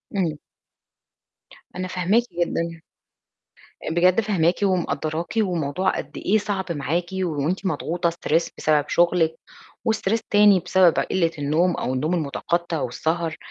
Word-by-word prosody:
إمم. 165 -6 0 1.4
أنا 185 0 -3
فاهماكِ 185 +6 +1 0.2
جدًا. 165 -1 -2 1.1
بجد 180 +5 +4
فاهماكِ 180 -5 +2
ومقدّراكِ، 170 -3 -1
والموضوع 180 -4 0
قد - - -7
إيه 215 +3 +2
صعب 195 -4 -3
معاكِ، 165 +3 -1
وأنتِ 180 0 -2
مضغوطة 175 -1 -1
stress 165 0 0
بسبب 150 -2 +2
شغلِك، 170 -2 +2 0.5
وstress 220 0 +1
تاني 205 -2 +6
بسبب 180 -1 +3
قلّة 170 -3 +1
النوم 160 +5 +1
أو 130 - -2
النوم 155 +7 0
المتقطِّع 170 +1 -2
والسهر، 160 +5 -2
175 Hz, 115 wpm, -23 LUFS, 160-185 Hz, 1.4 s, تاني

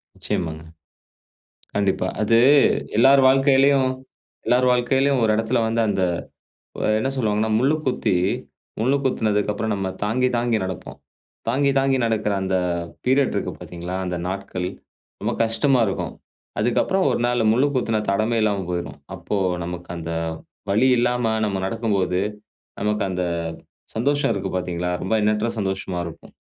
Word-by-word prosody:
நிச்சயமாங்க, 80 -1 -3 1.1
கண்டிப்பா. 95 -2 +1
அது, 115 +2 +4 0.6
எல்லார் 135 +3 +6
வாழ்க்கையிலேயும் 135 0 +4 0.5
எல்லார் 125 +1 +3
வாழ்க்கையிலேயும், 130 +2 +2
ஒரு 110 - +3
இடத்தில 115 +3 +1
வந்து 115 +1 +1
அந்த, 95 -2 0 0.8
வ - - -3 0.2
என்ன 135 - 0
சொல்லுவாங்கன்னா, 110 -3 0
முள்ளு 135 +5 +3
குத்தி, 120 -6 +1 0.6
முள்ளு 130 +5 +2
குத்துனதுக்கு 105 -5 +1
அப்புறம் 110 0 -2
நம்ம 95 -1 -2
தாங்கி 125 +5 +1
தாங்கி 120 -1 +1
நடப்போம். 95 -3 -6 0.5
தாங்கி 140 +3 +2
தாங்கி 135 0 +2
நடக்கிற 110 -2 0
அந்த 95 0 0 0.5
பீரியட் 135 +1 +3
இருக்கு - - -2
பாத்தீங்களா, 90 +1 -6
அந்த 90 - -2
நாட்கள், 95 -1 -4 0.5
ரொம்ப - - -1
கஷ்டமா 115 +3 +2
இருக்கும். 95 - -3 0.5
அதுக்கப்புறம், 185 - +1
ஒரு - - 0
நாள் 120 -3 +2
முள்ளு 130 +6 +3
குத்துன 110 -3 0
தடமே 110 +3 +1
இல்லாம 100 -3 +1
போயிடும். 85 -1 -4 0.2
அப்போ, 105 - -3 0.3
நமக்கு 90 0 -7
அந்த 85 0 -5 0.6
வழி 115 +6 +4
இல்லாம, 120 -2 +1
நம்ம 100 -2 -1
நடக்கும்போது, 100 -4 0 0.6
நமக்கு 105 0 0
அந்த 90 -1 -2 0.7
சந்தோஷம் 140 +3 +1
இருக்கு 95 -1 -3
பாத்தீங்களா, 90 0 -2
ரொம்ப 95 - -1
எண்ணற்ற 105 +2 +1
சந்தோஷமா 95 -2 -2
இருக்கும். 80 - -12
110 Hz, 135 wpm, -22 LUFS, 95-125 Hz, 1.1 s, எல்லார்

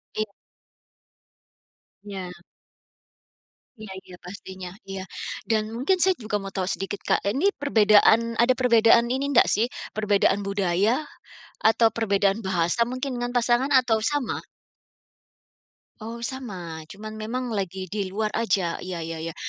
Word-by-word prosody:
Iya. 215 -2 -2 1.7
Ya. 195 -3 -6 1.5
Iya 215 -2 -9
iya 180 - -12
pastinya 185 0 -8 0.2
iya. 190 -1 -4 0.5
Dan 215 -1 +1
mungkin 275 +11 +2
saya 380 +1 +4
juga 215 -2 -4
mau 195 - -6
tahu 190 -2 0
sedikit, 195 +1 -4
Kak. - - +2
Ini 275 - +1
perbedaan 225 -2 +5
ada 240 +2 +5
perbedaan 235 -2 +5
ini 275 +2 -1
ndak 240 - +6
sih? 225 +3 +2 0.3
Perbedaan 205 -1 +2
budaya? 200 - +1 0.6
Atau 225 +1 +5
perbedaan 200 -2 +1
bahasa 180 +4 +1
mungkin 255 +2 -4
dengan 245 0 -3
pasangan 245 +3 +2
atau 250 -4 +4
sama? 290 -3 -1 1.6
Oh, 230 +2 -7
sama, 185 -11 -6
cuman 215 +5 -9
memang 245 +3 -3
lagi 190 -3 -3
di 200 -2 -2
luar 210 +3 -2
aja, 190 -6 0
ya 180 -2 -5
ya 165 0 -5
ya, 165 0 -5
215 Hz, 130 wpm, -25 LUFS, 195-240 Hz, 1.7 s, ndak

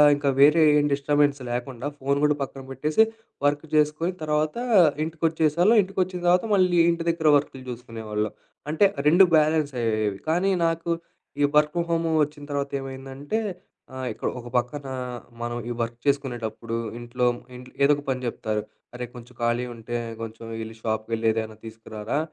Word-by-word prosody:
ఇంక 145 0 -6
వేరే 150 +3 +7 0.2
ఏం 145 - +2
డిస్టబెన్స్ 145 0 +2
లెకుండా 125 +2 -3
ఫోను 140 +1 +1
గూడా 150 0 +3
పక్కన 135 0 -8
పెట్టేసి 150 - +3 0.4
వర్క్ 145 +2 0
చేసుకొని 155 +4 +2
తర్వాత, 150 +3 0 0.5
ఇంటికొచ్చేసేవాళ్ళం. 165 +5 +2
ఇంటికొచ్చిన 185 -1 -2
తర్వాత 180 +4 +4
మళ్ళీ 180 -2 +3
ఇంటి 170 0 -1
దగ్గర 160 -2 -1
వర్కులు 135 -2 -5
జూసుకునేవాళ్ళం. 110 -3 -4 0.4
అంటే 195 +6 +5 0.2
2 180 +5 +7
బ్యాలెన్స్ 155 -2 +2
అయ్యేవి, 110 -3 0
కానీ 180 +4 +2 0.2
నాకు 165 +1 -1 0.5
ఈ - - +5
వర్క్ 150 0 +4
ఫ్రమ్ 170 0 0
హోమ్ 165 0 +1
వచ్చిన 145 0 -6
తర్వాత 140 0 -2
ఏమైందంటే, 135 +6 -5 0.6
ఆహ్, 130 0 -4
ఇక్కడ - - -4
ఒక 120 - -10
పక్కన 130 +4 -2 0.6
మనం 120 0 -3
ఈ - - -2
వర్క్ 115 0 -3
చేసుకునేటప్పుడు 120 -5 -1 0.2
ఇంట్లో, 120 +1 -2 0.3
ఇంట్ల్ 125 0 -12
ఏదో 140 - +6
ఒక 145 - -8
పని 130 -1 -1
చెప్తారు. 110 -2 -2 0.3
"అరే! 125 0 -4
కొంచెం 120 +1 -11
ఖాళీగుంటే 120 0 -2 0.3
కొంచెం 115 0 -7 0.2
యెళ్లి 110 0 -7
షాప్‌కి 110 0 -2
యెళ్లి 115 0 0
ఏదైనా 110 -1 -3
తీసుకురారా. 110 +3 -4
140 Hz, 150 wpm, -25 LUFS, 120-155 Hz, 0.6 s, వేరే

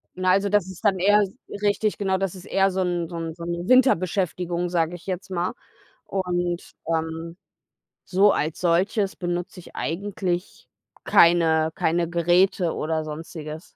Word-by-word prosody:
na, 185 0 +2
also, 200 +2 +2
das 205 -3 +2
ist 190 +1 -10
dann 195 -2 +4
eher 205 +3 +5
s 195 +1 -3 0.3
richtig, 210 +1 +1
genau, 190 -1 +1
das 195 -2 -2
ist 185 - -11
eher 195 0 +2
so 190 0 -1
'n 175 -2 -1
so 170 - -7
'n 165 -1 -4
so 170 - -9
'n 170 +1 -4
Winterbeschäftigung, 180 -7 +2
sage 170 0 0
ich 175 - -13
jetzt 190 +1 -4
mal. 175 0 -1 0.5
Und, 175 -2 -2 0.2
ähm, 165 +1 -3 0.7
so 195 +2 +4
als 155 +1 -2
solches 190 +4 +1
benutze 175 0 -4
ich - - -14
eigentlich 185 0 -3 0.4
keine 160 -2 +4
keine 170 +1 0
Geräte 175 +1 +2
oder 155 0 -2
Sonstiges. 155 0 -7
175 Hz, 155 wpm, -24 LUFS, 170-190 Hz, 0.7 s, eher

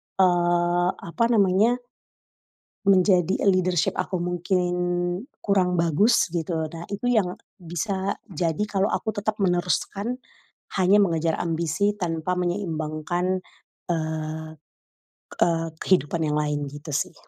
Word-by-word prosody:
eee, 175 -1 +3
apa 230 +8 -1
namanya 215 +1 +4 1.1
menjadi 185 -2 +4
leadership 185 -3 +2
aku 185 -3 -1
mungkin 175 +1 0 0.7
kurang 185 -3 +2
bagus 170 +9 +3
gitu. 165 -1 -2
Nah, 165 0 -7
itu 205 +5 -2
yang 205 -7 +2 0.2
bisa 190 +3 -2 0.2
jadi 165 +1 -1
kalo 200 -1 +1
aku 220 - -1
tetep 210 +1 -1
meneruskan 185 +5 0 0.6
hanya 190 +2 +5
mengejar 165 -3 +1
ambisi 170 +5 0
tanpa 170 -1 -1
menyeimbangkan, 175 0 -1 0.5
eee, 160 -1 -3 0.9
eee, 165 -1 +2
kehidupan 170 -2 +2
yang 150 - 0
lain 145 -1 -1
gitu 145 +1 -8
sih. 145 - -1
175 Hz, 110 wpm, -25 LUFS, 165-195 Hz, 1.1 s, hanya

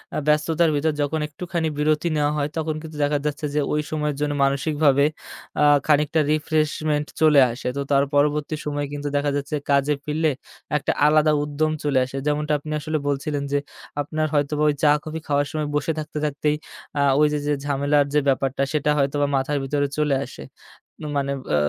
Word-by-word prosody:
আ - - 0
ব্যস্ততার 155 +2 +3
ভিতর 155 +2 +1
যখন 155 +2 0
একটুখানি 170 +2 -3
বিরতি 155 +2 +1
নেওয়া 145 0 +2
হয় 145 0 0
তখন 155 -1 -1
কিন্তু 155 -2 -9
দেখা 145 0 +2
যাচ্ছে 150 0 -2
যে, - - +3
ওই 150 - +1
সময়ের 150 -2 -1
জন্য 145 0 0
মানসিকভাবে 140 0 +2 0.6
আ - - +5 0.2
খানিকটা 150 +1 +3
রিফ্রেশমেন্ট 155 -1 0 0.2
চলে 150 -3 +6
আসে। 120 - -6
তো - - 0
তার 140 0 +4
পরবর্তী 150 +1 +1
সময়ে 145 -1 -2
কিন্তু 145 0 -4
দেখা 145 0 +1
যাচ্ছে 145 +2 -3
কাজে 140 +1 +3
ফিরলে 155 +1 +1 0.5
একটা - - -1
আলাদা 155 0 +4
উদ্যম 150 +1 -1
চলে 140 -3 +2
আসে। 135 +1 -7
যেমনটা 150 +1 0
আপনি 155 +1 -8
আসলে 155 +1 -2
বলছিলেন 140 +1 -1
যে, 145 - +2 0.4
আপনার 155 +2 -2
হয়তোবা 150 +1 +1
ওই - - +2
চা 150 - +6
কফি 160 +1 -5
খাওয়ার 145 0 +1
সময় 155 -1 -2
বসে 155 +2 0
থাকতে, 150 0 -6
থাকতেই, 150 +1 0 0.4
আ - - +3 0.2
ওই 150 - +5
যে, 150 - 0
যে, 150 - +2
ঝামেলার 145 0 +2
যে, 150 - +4
ব্যাপারটা 135 0 +1
সেটা 150 0 +1
হয়তোবা 140 +1 +1
মাথার 140 +2 0
ভিতরে 145 +1 0
চলে 150 -2 +2
আসে। 70 - -10 0.7
মানে 140 0 -1 0.2
ও - - +4
150 Hz, 185 wpm, -23 LUFS, 145-155 Hz, 0.7 s, চলে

